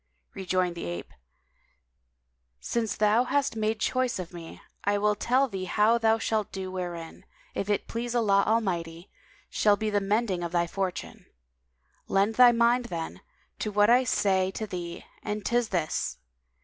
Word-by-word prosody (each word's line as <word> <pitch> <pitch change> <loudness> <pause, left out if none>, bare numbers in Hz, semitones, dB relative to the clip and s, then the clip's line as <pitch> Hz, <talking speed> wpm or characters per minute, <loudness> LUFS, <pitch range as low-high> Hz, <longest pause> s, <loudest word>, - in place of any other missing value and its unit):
Rejoined 185 -2 0
the 170 - -6
ape, 85 0 -6 1.5
"Since 230 -2 -2
thou 215 +3 +3
hast 280 -1 0
made 220 0 -1
choice 255 0 0
of 180 -1 -7
me, 170 -2 -9 0.2
I 205 0 +2
will 210 +1 +2
tell 255 +6 +2
thee 190 -5 -5
how 215 +5 +3
thou 225 -1 +3
shalt 220 -2 -1
do 190 -1 -5
wherein, 175 -3 -6 0.3
if 200 - -3
it 205 - 0
please 235 +1 -4
Allah 200 -4 +3
Almighty, 175 -6 -1 0.4
shall 205 -1 +3
be 215 0 -2
the 205 -1 +1
mending 200 -2 0
of 170 0 -4
thy 170 -1 +2
fortune. 185 +1 -4 0.8
Lend 200 +3 +2
thy 245 +1 +7
mind, 240 +1 +3
then, 165 -7 -5 0.4
to 215 - -2
what 205 +2 +4
I 250 +2 +5
say 190 -5 +2
to 215 +3 -4
thee 175 -4 -6 0.2
and 210 -1 -4
'tis 240 -1 +1
this! 155 - -1
205 Hz, 160 wpm, -27 LUFS, 185-230 Hz, 1.5 s, thy